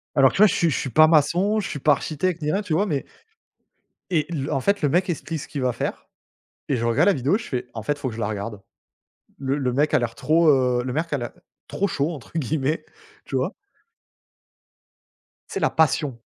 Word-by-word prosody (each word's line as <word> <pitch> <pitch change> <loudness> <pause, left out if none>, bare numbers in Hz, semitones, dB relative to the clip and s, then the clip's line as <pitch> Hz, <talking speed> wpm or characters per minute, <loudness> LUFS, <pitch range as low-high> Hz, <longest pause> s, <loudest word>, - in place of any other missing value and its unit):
alors, 135 -2 +6
tu - - -4
vois 215 - +8
je - - 0
suis 170 - +2
je - - 0
suis 135 - -3
pas 155 +6 +6
maçon, 175 +7 +3
je 185 - -5
suis 145 - -5
pas 150 +2 +4
architecte 165 +4 -2
ni 150 - 0
rien, 195 - 0
tu 190 -7 -3
vois? 200 +6 +2
Mais 145 -8 -2 1.0
et 155 -5 +1
le 155 -3 -3
en 135 - +1
fait 200 +7 +1
le 145 - +2
mec 180 +4 +1
explique 165 -1 -3
ce - - -8
qu'il 140 - -5
va 125 -1 +1
faire - - -5 0.6
et 140 - +2
je 115 - -2
regarde 135 +10 +3
la 200 - +5
vidéo, 140 - +1
je 235 - -8
fais: 125 -2 -3
«En 110 - -5
fait 145 +7 -1
faut 140 -3 -3
que 110 - -8
je 115 - -7
la 100 - -1
regarde». 105 -1 -5 0.8
Le 135 +1 -1
le 130 -3 -1
mec 145 +3 +1
a - - +5
l'air 115 -1 -3
trop, 165 +1 +2
heu 125 -3 +3
le 125 - -3
mec 165 +3 -2
a - - +2
l'ai 120 -2 -3 0.4
«trop 200 - -1
chaud» 150 -2 -1
entre 140 - -11
guillemets, 150 +2 -1 0.4
tu - - -5
vois? - - 0 2.0
Tu - - -9
sais, - - 0
la - - +2
passion. 145 -5 +1
145 Hz, 235 wpm, -23 LUFS, 130-165 Hz, 2.0 s, vois